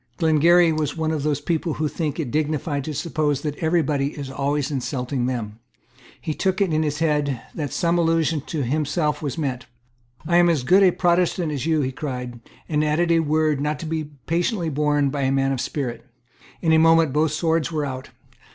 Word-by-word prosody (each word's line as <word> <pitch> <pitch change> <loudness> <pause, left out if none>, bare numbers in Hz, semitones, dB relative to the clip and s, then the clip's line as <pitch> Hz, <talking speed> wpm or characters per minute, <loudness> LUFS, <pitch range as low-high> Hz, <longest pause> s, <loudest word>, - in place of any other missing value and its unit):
Glengarry 165 +2 +4
was 155 -1 -2
one 160 0 0
of 155 -2 -1
those 145 -1 0
people 160 +1 -2
who 155 - -1
think 155 0 -3
it 140 -7 -3
dignified 150 -1 -1
to 155 - -4
suppose 150 -3 -1
that 150 -1 -3
every 165 0 +1
body 140 0 -1
is 140 -2 -6
always 140 +1 -1
insulting 125 -2 -2
them. 115 -4 -4 0.6
He 155 - -3
took 190 +4 -1
it 190 -5 +1
into 155 0 +1
his 145 -1 -2
head 150 -5 0
that 145 -5 -4
some 170 0 +1
allusion 165 -2 +1
to 155 -4 -2
himself 150 +3 -1
was 145 -5 -4
meant. 130 -5 -3 0.6
"I 170 +2 +3
am 175 0 +5
as 155 -7 +1
good 185 +8 +5
a 190 - +7
Protestant 175 -2 +1
as 145 +1 -3
you." 160 -2 +2
he 130 -1 -1
cried, 125 -4 -5 0.3
and 150 -1 +1
added 160 +3 +1
a 165 - +4
word 155 -2 +1
not 150 0 -1
to 165 - -7
be 160 -1 -2 0.2
patiently 170 +1 0
borne 145 -1 +1
by 145 0 -2
a 135 0 +1
man 135 0 +1
of 130 -2 -1
spirit. 125 -5 -4 0.6
In 160 -1 +3
a 160 - +6
moment 165 -3 +4
both 155 +1 +2
swords 165 +1 0
were 155 -2 -1
out. 130 -1 -6
150 Hz, 205 wpm, -23 LUFS, 140-165 Hz, 0.6 s, a